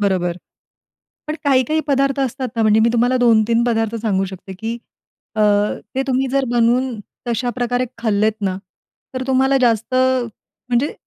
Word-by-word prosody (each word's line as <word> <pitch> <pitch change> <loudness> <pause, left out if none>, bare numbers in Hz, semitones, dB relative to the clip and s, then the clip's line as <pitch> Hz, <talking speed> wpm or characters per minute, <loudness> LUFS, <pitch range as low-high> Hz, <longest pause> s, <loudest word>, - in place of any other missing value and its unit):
बरोबर. 180 -3 0 0.9
पण 305 - -2
काही-काही 280 +2 +2
पदार्थ 275 0 +1
असतात 260 0 -2
ना 225 - 0
म्हणजे 215 0 +4
मी 230 +1 +4
तुम्हाला 245 +2 +2
2-3 230 -1 +3
पदार्थ 225 -1 0
सांगू 195 -4 0
शकते, 190 0 -9
की 225 +5 -4 0.6
अ, 215 - +1 0.5
ते 265 - +1
तुम्ही 265 +1 +1
जर 275 -1 +1
बनवून 240 0 +1 0.3
तशाप्रकारे 245 +1 -1
खाल्लेत 220 -2 +1
ना, 190 -2 -1 0.6
तर 255 0 -3
तुम्हाला 265 +1 +3
जास्त 230 +1 +1
म्हणजे 255 +1 -1
240 Hz, 140 wpm, -19 LUFS, 220-260 Hz, 0.9 s, म्हणजे